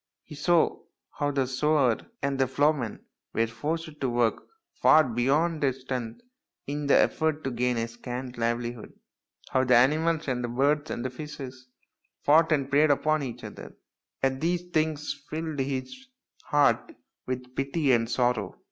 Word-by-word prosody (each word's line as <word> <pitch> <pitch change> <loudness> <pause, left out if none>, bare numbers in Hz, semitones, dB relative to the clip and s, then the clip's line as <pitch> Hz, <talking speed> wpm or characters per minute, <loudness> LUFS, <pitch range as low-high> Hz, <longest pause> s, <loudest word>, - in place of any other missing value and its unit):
He 155 - -12
saw 160 +3 +2 0.3
how 145 -1 -1
the 140 -2 +1
sower 130 -1 +2 0.3
and 140 -1 -1
the 135 - +3
ploughman 140 -3 0 0.3
were 115 - +3
forced 150 +7 -4
to 130 - +1
work 120 -2 0 0.3
far 155 - +6
beyond 140 +7 +1
their 135 -2 +2
strength 125 - -5 0.4
in 145 +1 -3
the - - +6
effort 155 -1 +1
to 135 - -2
gain 125 0 0
a 115 0 -1
scanty 125 +1 -7
livelihood, 120 0 -2 0.6
how 130 - +3
the 125 -1 +4
animals 155 +6 +3
and 120 -2 -2
birds 145 +2 +2
and 130 +1 -4
fishes 130 -3 -8 0.6
fought 160 +3 +5
and 140 -3 +1
preyed 150 +2 +5
upon 155 +2 +2
each 125 -4 -6
other, - - -10 0.5
and 135 0 +1
these 175 +2 0
things 155 -2 0 0.2
filled 155 -2 -4
his 135 - -4 0.4
heart 145 -1 +2 0.3
with 125 0 -5
pity 140 +1 +1
and 115 -2 +2
sorrow. 120 -5 0
135 Hz, 150 wpm, -27 LUFS, 125-150 Hz, 0.6 s, far